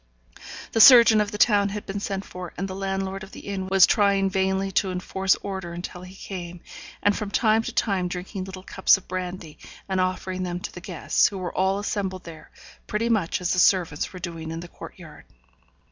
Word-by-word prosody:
The 225 - +3
surgeon 235 -4 +9
of 210 - -1
the 210 - -5
town 205 -2 +4
had 210 +1 -6
been 195 +1 -4
sent 195 -1 -4
for, 180 -1 -9
and 195 - -2
the 190 - -6
landlord 195 0 -3
of 195 0 -11
the - - -9
inn 195 -2 -5
was 190 -1 +6
trying 200 -2 +2
vainly 190 +1 0
to 190 0 +1
enforce 190 +1 0
order 190 -3 -5
until 175 +1 -7
he 185 +1 -12
came, 180 -3 -8 0.4
and, 205 0 +3
from 210 - -4
time 220 +1 +2
to - - -5
time, 190 -4 0
drinking 185 +2 -5
little 190 -1 -9
cups 190 +1 +3
of 195 - -15
brandy, 180 -3 -6 0.3
and 190 -1 0
offering 185 0 -2
them 175 -1 -3
to - - -6
the 180 - -9
guests, 180 -2 +1
who 200 - -6
were 180 -2 -5
all 190 +1 +1
assembled 195 -2 -3
there, 160 -2 -12 0.4
pretty 230 +2 -1
much 195 -7 0
as 180 - 0
the 185 - +1
servants 175 -5 +2
were 185 - -9
doing 165 -3 -6
in 165 +1 -5
the 175 - -9
court - - -12
yard. - - -13
190 Hz, 210 wpm, -24 LUFS, 180-200 Hz, 0.4 s, surgeon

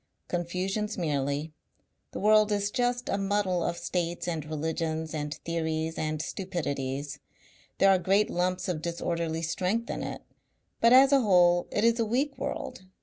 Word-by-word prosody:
"Confusions 185 +5 -2
merely. 145 -2 -1 0.6
The - - -6
world 215 +1 +4
is 205 0 0
just 245 +1 0
a 195 - 0
muddle 195 -3 0
of 170 - -2
states 175 -1 -2
and 165 -3 -2
religions 160 +1 -3
and 150 -1 -3
theories 160 -1 -2
and 155 0 -2
stupidities. 145 -7 -4 0.6
There 195 - +5
are 190 - +4
great 195 +4 +2
lumps 180 +1 -1
of 170 -4 -2
disorderly 170 -1 -2
strength 185 +8 -1
in - - -4
it, - - -5 0.6
but 230 - +5
as 265 +2 +7
a 275 -1 +5
whole 175 -4 +4
it 205 - -1
is 230 +1 +3
a 230 - +2
weak 270 +6 0
world. 265 - -5
175 Hz, 155 wpm, -28 LUFS, 160-205 Hz, 0.6 s, as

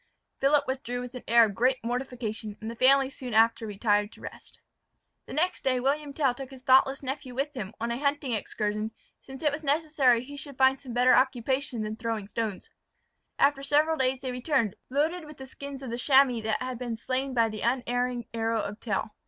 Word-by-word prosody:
Philip 280 +1 +4
withdrew 260 -2 -3
with 250 0 -7
an 250 - -7
air 235 0 +7
of 205 - -4
great 255 +5 +2
mortification 230 -4 -4
and 220 +1 -5
the - - -8
family 270 +2 +5
soon 255 -4 -6
after 230 0 +4
retired 205 0 +1
to - - -16
rest. - - -10 0.7
The - - -8
next 355 +5 0
day 255 -1 +2
William 285 +3 0
Tell 275 -3 +1
took 265 +1 -8
his 265 -2 -13
thoughtless 270 +2 +4
nephew 265 -1 -5
with 280 +3 -2
him, 220 -6 -6
on 230 +1 -2
a 235 - -2
hunting 285 -2 0
excursion, 215 0 -2 0.3
since 265 +2 -11
it 300 - +3
was 300 +2 -5
necessary 285 -5 +2
he 285 +2 -10
should 280 -1 -6
find 265 0 +4
some 255 -4 -8
better 250 +1 +5
occupation 260 -1 +1
than 215 +1 -4
throwing 225 -3 -3
stones. 215 -2 -4 0.7
After 280 0 +3
several 295 +3 +2
days 260 -2 0
they 260 -1 -3
returned, 250 - 0
loaded 315 +6 0
with 300 -1 -12
the 265 - -8
skins 275 +1 -8
of 250 - -5
the 235 - -3
chamois 265 -3 +4
that 220 +3 -1
had 255 -2 -5
been 240 -3 -4
slain 260 +3 -2
by 230 -1 +3
the 215 -1 -6
unerring 245 0 0
arrow 225 0 0
of 205 +2 -6
Tell. 215 -1 -2
255 Hz, 205 wpm, -28 LUFS, 230-275 Hz, 0.7 s, air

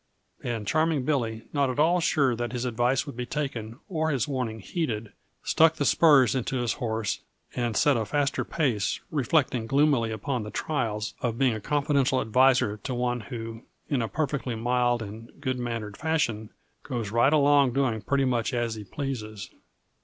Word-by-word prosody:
And 115 -3 -3
Charming 155 +1 +1
Billy, 115 -7 -1
not 140 -2 +2
at 125 - -3
ail 165 +4 +4
sure 140 -6 +2
that 120 +1 -4
his 125 0 -2
advice 125 +3 +1
would 140 - -8
be 125 0 -4
taken 120 -6 -4
or 160 -3 -1
his 135 -7 0
warning 125 -5 -3
heeded, 110 - -3 0.3
stuck 160 0 +4
the 145 - -1
spurs 145 -7 +5
into 130 0 -1
his 120 -2 0
horse 110 -5 -2 0.4
and 120 -3 -1
set 145 -4 +4
a 115 - 0
faster 145 +6 0
pace 125 -11 0
reflecting 130 -4 +1
gloomily 135 -3 +3
upon 120 +4 -2
the 105 - -6
trials 110 -7 -2
of 115 -2 -1
being 120 -5 +1
confidential 140 -1 +1
adviser 125 -2 +3
to 125 +4 -5
one 120 0 0
who, 115 +1 -7 0.3
in 140 -4 +1
a 115 - -1
perfectly 140 -3 -2
mild 120 0 +1
and 110 +5 -10
good 130 -3 -2
mannered 115 -4 -4
fashion, 120 -9 -1 0.3
goes 115 -7 -4
right 120 +5 +4
along 145 -3 +4
doing 125 -5 0
pretty 135 +4 +1
much 120 -2 0
as 120 -1 0
he 110 -1 -7
pleases. 110 -3 -5
125 Hz, 170 wpm, -27 LUFS, 115-140 Hz, 0.4 s, spurs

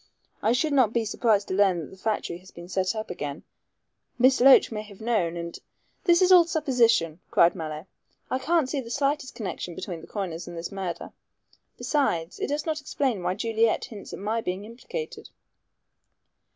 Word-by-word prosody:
I 220 - +2
should 295 +4 +1
not 250 -6 +4
be 230 -1 +1
surprised 215 -2 +1
to - - -1
learn 190 -2 +3
that 150 - -9
the - - -11
factory 190 -3 -2
had 185 - -16
been 170 0 -9
set 185 +3 0
up 215 -2 -4
again; 145 -4 -5 0.7
Miss 255 +1 +4
Loach 265 -1 +7
may 215 -1 -3
have 205 -2 -13
known 215 -7 0
and 170 0 -6 0.2
" - - -43
"This 345 0 +5
is 370 - +4
all 355 -2 +8
supposition," 230 - +2
cried 170 - +5
Mallow. 155 -2 -6 0.4
"I 260 - -1
can't 315 +1 +2
see 275 0 -2
the 230 - -10
slightest 280 +1 -1
connection 185 -5 -5
between 170 -2 -6
the - - -12
coiners 175 -5 -4
and 175 -1 -7
this 165 +4 -5
murder. 190 -3 -5 0.7
Besides, 180 - 0
it - - -1
does 290 +1 -2
not 315 -2 -2
explain 265 -7 -1
why 180 +1 -1
Juliet 225 +1 +1
hints 210 -4 -10
at - - -6
my 215 +3 -1
being 190 0 -4
implicated." 260 - -7
215 Hz, 190 wpm, -26 LUFS, 180-260 Hz, 0.7 s, all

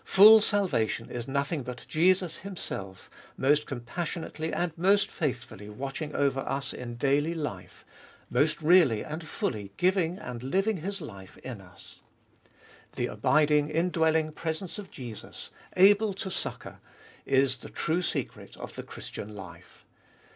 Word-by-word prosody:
Full 215 +3 +9
salvation 185 - 0
is 120 -1 -4
nothing 140 +3 -1
but 125 -1 -7
Jesus 180 +1 +2
Himself, 100 - -6 0.3
most 145 +3 +3
compassionately 160 +5 -4
and 175 -2 -1
most 195 +4 +3
faithfully 120 - -4
watching 135 +6 -5
over 140 -1 +2
us 135 +1 -3
in 120 -1 -6
daily 145 +6 +1
life, 100 - -6 0.4
most 155 +1 +1
really 155 -10 +5
and 155 +2 -5
fully 105 -9 -3
giving 180 -1 +2
and 125 - -7
living 195 - +1
His 195 +4 -4
life 100 -10 -10
in 120 -6 -6
us. 90 -2 -15 0.9
The - - 0
abiding, 150 0 +3
indwelling 160 -1 +2
presence 165 +5 -4
of 200 -3 -8
Jesus, 120 -5 -8 0.3
able 205 +2 +6
to 190 0 -4
succour, - - -5 0.5
is 135 -1 +3
the - - -10
true 165 +3 0
secret 180 - -3
of - - -8
the - - -6
Christian 105 +1 -8
life. 95 -3 -12
150 Hz, 135 wpm, -28 LUFS, 125-175 Hz, 0.9 s, Full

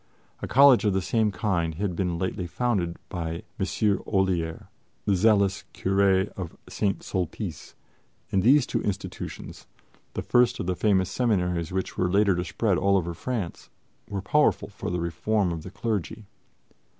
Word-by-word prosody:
A - - -3
college 135 -1 +6
of 105 -2 +2
the 95 - +1
same 110 0 +1
kind 85 -5 -1
had 95 0 -2
been 90 -1 -1
lately 90 0 -2
founded 95 -5 -1
by 85 -2 -4 0.2
M. 105 -2 +1
Olier, 90 -5 0 0.4
the 100 - +3
zealous 100 -1 +3
curé 95 0 +2
of 90 -4 -8
St. 100 -2 -1
Sulpice; 90 -4 -4 0.6
and 95 - +2
these 130 +6 +5
two - - -2
institutions, 100 -1 -5 0.5
the - - -2
first 125 0 +3
of 100 - -2
the 90 0 -1
famous 95 -2 +2
seminaries 90 -8 0
which 95 0 -3
were 90 - +2
later 100 +1 +4
to 90 - -1
spread 90 +3 0
all 100 +1 +3
over 85 -2 -2
France, 105 0 -4 0.4
were 100 -1 -4
powerful 150 +8 +2
for 100 - -6
the 90 0 -1
reform 90 +3 0
of 85 -2 -4
the 95 - -8
clergy. 110 0 -3
95 Hz, 160 wpm, -26 LUFS, 90-105 Hz, 0.6 s, college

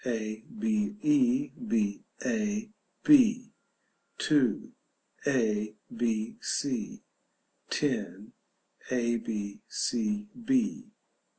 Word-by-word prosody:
a. 110 -3 -3 0.2
b. 215 -1 +1
e. 285 -2 +3 0.2
b. 105 - +1 0.2
a. 215 -2 0 0.3
b. 245 -5 +6 0.6
2. 135 -8 +2 0.6
a. 110 -6 +1 0.2
b. 115 -2 0
c. 125 -6 -2 0.7
10. - - -2 0.6
a. 120 -2 +1
b. 105 -3 -4
c. 210 -3 -1
140 Hz, 75 wpm, -30 LUFS, -, 0.7 s, b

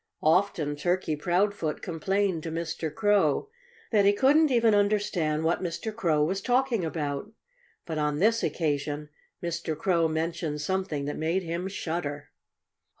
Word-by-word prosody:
Often 155 -3 +2
Turkey 175 0 0
Proudfoot 175 0 0
complained 185 +1 0
to 165 - -5
Mr. 165 -1 -3
Crow 205 - +2 0.4
that 210 -3 +4
he 200 +1 +5
couldn't 290 +8 +4
even 235 -4 +4
understand 200 -7 +1
what 165 +2 +1
Mr. 185 +5 -4
Crow 165 -9 +2
was 190 +5 -1
talking 245 -3 +1
about. 155 +3 -3 0.5
But 160 -2 -3
on 150 -1 0
this 225 +7 +3
occasion 150 -1 -2 0.3
Mr. 170 -2 -3
Crow 170 -1 +2
mentioned 160 -1 -2
something 175 -4 -2
that 145 - -3
made 170 +4 0
him 170 +2 -3
shudder. 160 -6 -4
170 Hz, 140 wpm, -27 LUFS, 155-200 Hz, 0.5 s, he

